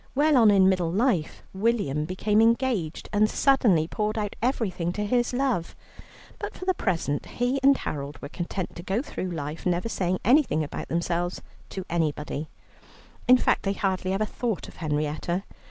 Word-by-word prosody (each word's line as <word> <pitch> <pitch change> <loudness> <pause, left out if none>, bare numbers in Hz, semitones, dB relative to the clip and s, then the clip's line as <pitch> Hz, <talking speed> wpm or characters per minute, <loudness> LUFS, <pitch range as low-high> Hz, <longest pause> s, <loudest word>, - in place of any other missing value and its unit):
Well 300 +2 +4
on 230 -4 +7
in 195 -2 +5
middle 180 -3 +2
life, 195 - 0
William 190 -9 0
became 205 +5 +1
engaged, 230 -8 +1
and 210 +1 +4
suddenly 215 - +3
poured 215 +4 -2
out 205 -2 -2
everything 205 -9 0
to 210 +1 -2
his 240 +3 +1
love, 250 -9 -1 0.6
but - - -5
for 370 - -7
the 375 - +3
present 165 - -1
he 245 +3 -1
and 275 0 +5
Harold 140 -2 -5
were 140 - -7
content 175 +3 -4
to - - -6
go 195 +8 -1
through 185 -10 -5
life 155 -2 -5
never 180 +4 0
saying 185 -3 0
anything 245 - +4
about 145 - -6
themselves 170 +1 -2 0.3
to 190 -2 -6
anybody. 155 -2 -2 0.8
In 255 +1 +8
fact, - - +2
they 195 - -1
hardly 190 -2 -1
ever 195 +3 +1
thought 225 -1 -3
of - - -14
Henrietta. 155 +3 -2
190 Hz, 170 wpm, -26 LUFS, 170-235 Hz, 0.8 s, In